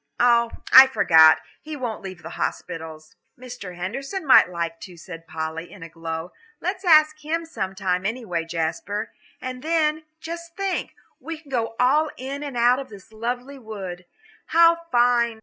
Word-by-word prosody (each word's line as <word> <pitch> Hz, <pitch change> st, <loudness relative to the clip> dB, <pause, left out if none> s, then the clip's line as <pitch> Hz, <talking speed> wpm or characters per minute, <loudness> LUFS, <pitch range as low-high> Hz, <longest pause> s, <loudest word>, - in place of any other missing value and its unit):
Oh, 235 Hz, -1 st, +4 dB, 0.2 s
I 265 Hz, 0 st, +11 dB
forgot; 160 Hz, -11 st, +6 dB, 0.2 s
he 310 Hz, 0 st, -7 dB
won't 245 Hz, -6 st, -4 dB
leave 185 Hz, -2 st, -9 dB
the -, -, -8 dB
hospitals." 160 Hz, -1 st, -5 dB, 0.2 s
"Mr. 245 Hz, -8 st, -9 dB
Henderson 270 Hz, -, -5 dB
might 265 Hz, -, +7 dB
like 170 Hz, -1 st, -4 dB
to," 175 Hz, +2 st, -11 dB
said 165 Hz, -1 st, -10 dB
Polly, 160 Hz, +1 st, -5 dB
in 185 Hz, -, -11 dB
a 165 Hz, -, -9 dB
glow, 165 Hz, +1 st, -6 dB, 0.3 s
"let's -, -, -3 dB
ask 310 Hz, -3 st, +5 dB
him 325 Hz, +2 st, -3 dB
sometime, 190 Hz, -, -2 dB
anyway, 195 Hz, -6 st, -3 dB
Jasper. 170 Hz, +6 st, -3 dB, 0.3 s
And 255 Hz, 0 st, -6 dB
then, 315 Hz, 0 st, 0 dB
just 335 Hz, +1 st, -8 dB
think, 390 Hz, -2 st, -2 dB, 0.2 s
we 330 Hz, 0 st, -6 dB
can 300 Hz, -3 st, -18 dB
go 230 Hz, -3 st, -1 dB
all 295 Hz, +5 st, +3 dB
in 270 Hz, +3 st, -6 dB
and 280 Hz, -4 st, -5 dB
out 250 Hz, +3 st, +2 dB
this 205 Hz, 0 st, -14 dB
lovely 245 Hz, +5 st, -4 dB
wood. 190 Hz, -6 st, -7 dB, 0.4 s
How 335 Hz, 0 st, +4 dB
fine!" 240 Hz, -2 st, +3 dB
235 Hz, 155 wpm, -23 LUFS, 180-285 Hz, 0.4 s, I